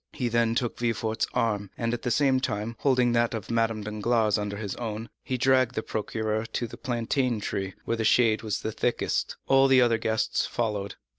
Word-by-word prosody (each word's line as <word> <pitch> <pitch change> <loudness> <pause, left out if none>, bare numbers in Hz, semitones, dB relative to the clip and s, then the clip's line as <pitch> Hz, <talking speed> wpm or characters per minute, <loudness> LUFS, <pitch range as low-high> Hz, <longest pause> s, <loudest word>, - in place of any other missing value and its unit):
He 125 -5 -1
then 115 0 +2
took 120 -1 -1
Villefort's 115 -2 -1
arm, 105 -4 0
and, 115 0 -1
at 120 - -3
the - - -2
same 135 0 +3
time, 110 -2 -3
holding 125 -3 +3
that 120 0 +2
of 110 0 -6
Madame 115 -2 0
Danglars 110 0 +1
under 100 0 -3
his 100 -2 -4
own, 115 -1 -5
he 130 - -2
dragged 130 -1 +3
the 110 - -2
procureur 110 +1 -2
to 120 - -3
the 120 - -8
plantain 120 0 -1
tree, 95 -2 -3
where 115 - -1
the 110 - -1
shade 110 -1 +4
was 110 -2 -2
thickest. 110 +2 -1
All 135 0 +5
the 130 -1 +6
other 115 -2 +3
guests 110 0 0
followed. 105 -4 -2
115 Hz, 195 wpm, -27 LUFS, 110-120 Hz, -, the